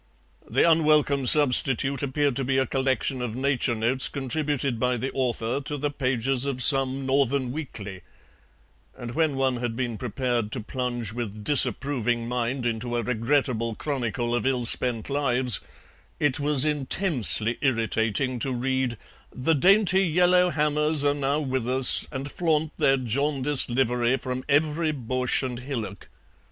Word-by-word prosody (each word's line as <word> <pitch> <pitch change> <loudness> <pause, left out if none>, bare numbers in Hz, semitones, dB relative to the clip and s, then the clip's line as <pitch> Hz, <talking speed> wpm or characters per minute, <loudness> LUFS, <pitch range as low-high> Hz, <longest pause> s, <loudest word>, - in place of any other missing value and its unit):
The 125 - +2
unwelcome 150 -4 +2
substitute 135 -1 +5
appeared 140 -1 -1
to 135 - -1
be 130 +1 0
a 135 - +2
collection 130 -1 -1
of 120 -2 -4
nature 130 -2 0
notes 120 +4 0
contributed 140 -2 -2
by 125 0 0
the 130 +4 -4
author 125 0 -2
to 145 - -4
the 145 +1 -2
pages 130 -1 -1
of 135 -3 -2
some 135 -1 +5
Northern 135 -1 0
weekly, 105 -10 -7 1.0
and 120 0 -7
when 155 -1 0
one 135 -2 0
had 120 -1 -4
been 120 -3 -4
prepared 120 -2 -2
to 130 - -4
plunge 120 -1 -4
with 110 -3 -6
disapproving 120 -3 +1
mind 125 +1 -3
into 120 +1 -2
a 120 - -2
regrettable 115 -1 -1
chronicle 120 -3 -3
of 120 0 -1
ill 125 -2 -1
spent 120 -1 0
lives 130 -5 +1 0.6
it 145 -3 0
was 145 -1 0
intensely 135 - 0
irritating 115 0 0
to 130 - -2
read 130 -1 -2 0.3
"the 135 +6 0
dainty 190 +4 +4
yellow 180 +1 +3
hammers 150 -1 +1
are 145 0 +2
now 145 +1 -1
with 130 -4 -3
us 130 0 +5
and 135 +1 -6
flaunt 160 -2 0
their 135 0 +3
jaundiced 135 +3 0
livery 120 0 +1
from 130 0 -5
every 155 +2 +1
bush 130 -1 -1
and 125 -2 -4
hillock." 120 -7 -6
130 Hz, 145 wpm, -25 LUFS, 120-145 Hz, 1.0 s, substitute